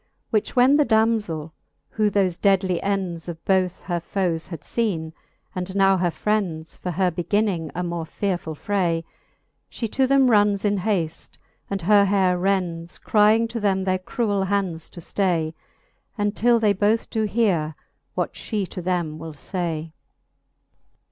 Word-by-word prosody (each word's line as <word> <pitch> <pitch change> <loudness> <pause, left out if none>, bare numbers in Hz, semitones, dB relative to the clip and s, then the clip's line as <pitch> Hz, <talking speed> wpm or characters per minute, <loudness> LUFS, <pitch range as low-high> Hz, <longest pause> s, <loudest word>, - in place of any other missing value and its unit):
Which 215 -2 0
when 260 +3 +6
the 300 - +5
damzell, 220 - +1 0.4
who 215 -1 +2
tkofe 190 -4 0
deadly 190 -3 +2
ends 185 -4 -2
Of 165 -1 -8
both 185 -2 +1
her 175 -2 -2
foes 170 -2 -2
had 165 -4 -7
feene, 165 -5 -2 0.4
and 185 +1 -4
now 195 -1 +4
her 180 -1 +1
frends 170 -2 -2
For 180 - -5
her 180 +1 +1
beginning 175 -1 0
a 180 - -1
more 170 -2 -3
fearefull 175 -3 -3
fray, 175 -4 0 0.7
She 230 - -4
to 265 +4 +2
them 275 -1 +4
runnes 205 -1 +3
in 205 0 +2
haft, 180 -5 -2 0.3
and 195 -3 -3
her 200 +2 +5
haire 190 -2 +2
rends, 175 -3 -1
Crying 215 +2 +3
to 230 0 -4
them 195 -2 +1
their 185 -1 0
cruell 200 0 -1
hands 185 -5 -1
to - - -11
ftay, 165 -4 0 0.6
Untill 215 +3 +2
they 210 -2 +3
both 210 +3 +1
doe 220 -1 0
heare, 180 -9 +1 0.4
what - - -1
fhe 210 -4 -3
to 180 - -6
them 170 -3 -2
will 160 0 -7
fay. 165 -1 -4
190 Hz, 155 wpm, -23 LUFS, 170-210 Hz, 0.7 s, when